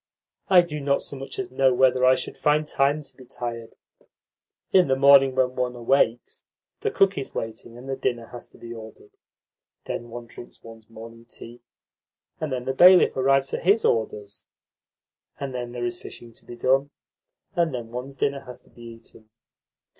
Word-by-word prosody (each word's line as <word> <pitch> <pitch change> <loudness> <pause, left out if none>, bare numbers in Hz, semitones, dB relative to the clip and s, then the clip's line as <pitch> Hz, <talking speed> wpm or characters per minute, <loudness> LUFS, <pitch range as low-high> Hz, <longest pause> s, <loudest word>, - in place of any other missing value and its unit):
I 185 -2 +7
do 155 -3 -6
not 140 0 0
so - - -6
much 135 0 -8
as 390 -2 -5
know 130 -2 +2
whether 130 0 +3
I 130 0 +6
should - - -6
find 150 0 +1
time 145 +1 0
to - - -12
be 130 - -15
tired. 120 -2 -7 1.0
In 185 -2 +5
the 135 - +2
morning, 135 -1 +6
when 130 -1 +1
one 125 -1 -2
awakes, 120 -1 0 0.4
the - - -1
cook 195 -3 +2
is 135 - -8
waiting, 115 +1 -6
and 125 +2 -11
the 135 - -2
dinner 125 -3 -2
has 120 - -10
to - - -21
be 120 0 -9
ordered. 115 - -12 0.7
Then 120 - -5
one 120 +1 -8
drinks 120 +1 -13
one's 115 -1 -14
morning 115 +1 -12
tea, 120 +1 -11 0.8
and 155 -2 -4
then 125 -1 -3
the 130 - -1
bailiff 180 +5 +6
arrives 135 +1 +2
for - - -1
HIS 200 +6 +2
orders, 105 -3 -2 1.0
and 140 -2 -5
then 120 -1 -5
there 120 0 -4
is 120 0 -4
fishing 115 -1 -11
to - - -15
be 120 - -10
done, 135 +3 +1 0.7
and 170 -2 +1
then 120 -3 -6
one's 125 +3 -7
dinner 140 0 -1
has 125 -1 -9
to - - -26
be 120 - -17
eaten. 115 -1 -13
130 Hz, 185 wpm, -24 LUFS, 120-140 Hz, 1.0 s, I